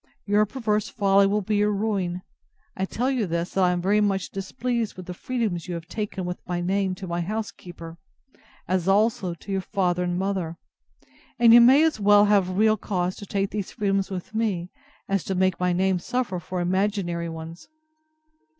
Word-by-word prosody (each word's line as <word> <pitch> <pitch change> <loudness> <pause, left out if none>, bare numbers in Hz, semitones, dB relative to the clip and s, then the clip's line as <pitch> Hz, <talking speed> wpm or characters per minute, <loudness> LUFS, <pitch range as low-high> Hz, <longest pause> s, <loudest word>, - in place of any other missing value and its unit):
Your 210 +1 +3
perverse 215 -3 -1
folly 200 -2 +3
will 205 +1 0
be 210 +2 0
your 210 +1 +2
ruin: 195 -4 -1 0.5
I 190 - -1
tell 250 +7 -1
you 240 -7 0
this, 170 +1 -2
that 190 - +1
I 180 - +4
am 175 -1 -1
very 205 +3 +3
much 195 -2 0
displeased 230 +3 -3
with 185 - -8
the 180 - -6
freedoms 215 -5 -3
you 175 - -3
have 165 -1 -7
taken 200 0 -4
with 180 0 -4
my 175 -1 -2
name 190 +1 0
to 190 - -8
my 170 0 -2
housekeeper, 175 -4 -6 0.7
as 185 -1 0
also 195 -3 +2
to 195 - -10
your 195 -1 0
father 180 -2 0
and 175 0 -1
mother; 185 -4 -2 0.8
and 235 -1 +6
you 240 - +10
may 265 +6 +7
as 320 -8 +1
well 205 0 +6
have 195 -3 +2
real 215 +1 +4
cause 185 -3 -2
to 205 - -9
take 195 0 -1
these 205 -3 -4
freedoms 195 -3 0
with 190 +2 -6
me, 200 -6 -1 0.4
as 195 -1 0
to 190 - -2
make 185 -1 +1
my 180 0 +1
name 185 +1 +1
suffer 235 -2 -2
for 180 +1 -4
imaginary 180 -2 -1
ones. 165 +1 -9
195 Hz, 190 wpm, -25 LUFS, 180-210 Hz, 0.8 s, you